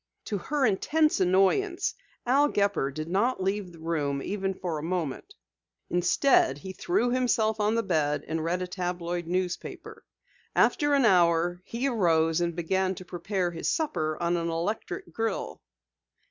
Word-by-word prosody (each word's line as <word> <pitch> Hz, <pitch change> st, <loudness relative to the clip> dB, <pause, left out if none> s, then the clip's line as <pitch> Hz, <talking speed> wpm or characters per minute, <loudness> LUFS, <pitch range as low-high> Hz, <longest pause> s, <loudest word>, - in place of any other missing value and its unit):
To 205 Hz, -, -2 dB
her 285 Hz, +7 st, 0 dB
intense 300 Hz, +9 st, +2 dB
annoyance, 195 Hz, -, +2 dB, 0.3 s
Al 275 Hz, +4 st, +4 dB
Gepper 200 Hz, -, +1 dB
did 155 Hz, +3 st, -5 dB
not 205 Hz, +8 st, +1 dB
leave 195 Hz, -1 st, -1 dB
the 170 Hz, -, -14 dB
room 150 Hz, -4 st, -1 dB
even 195 Hz, -1 st, -2 dB
for 170 Hz, -4 st, -3 dB
a -, -, -6 dB
moment. 180 Hz, -, -3 dB, 0.6 s
Instead 175 Hz, -, +3 dB
he 190 Hz, +6 st, -8 dB
threw 230 Hz, +7 st, 0 dB
himself 225 Hz, -4 st, +1 dB
on 210 Hz, +2 st, +2 dB
the 230 Hz, -, +1 dB
bed 150 Hz, -6 st, 0 dB
and 160 Hz, 0 st, -2 dB
read 180 Hz, +2 st, -1 dB
a -, -, -4 dB
tabloid 175 Hz, -2 st, -3 dB
newspaper. 180 Hz, 0 st, -4 dB, 0.5 s
After 290 Hz, -1 st, +3 dB
an 275 Hz, -3 st, +3 dB
hour, 175 Hz, -2 st, +3 dB
he 240 Hz, +4 st, -2 dB
arose 165 Hz, -8 st, +2 dB
and 170 Hz, -1 st, -1 dB
began 190 Hz, +2 st, 0 dB
to 185 Hz, -, -10 dB
prepare 180 Hz, +1 st, -2 dB
his 165 Hz, -, -2 dB
supper 155 Hz, -, -1 dB
on 175 Hz, 0 st, +1 dB
an 170 Hz, 0 st, -2 dB
electric 215 Hz, -, -3 dB
grill. 225 Hz, 0 st, -3 dB
185 Hz, 155 wpm, -27 LUFS, 170-225 Hz, 0.6 s, Al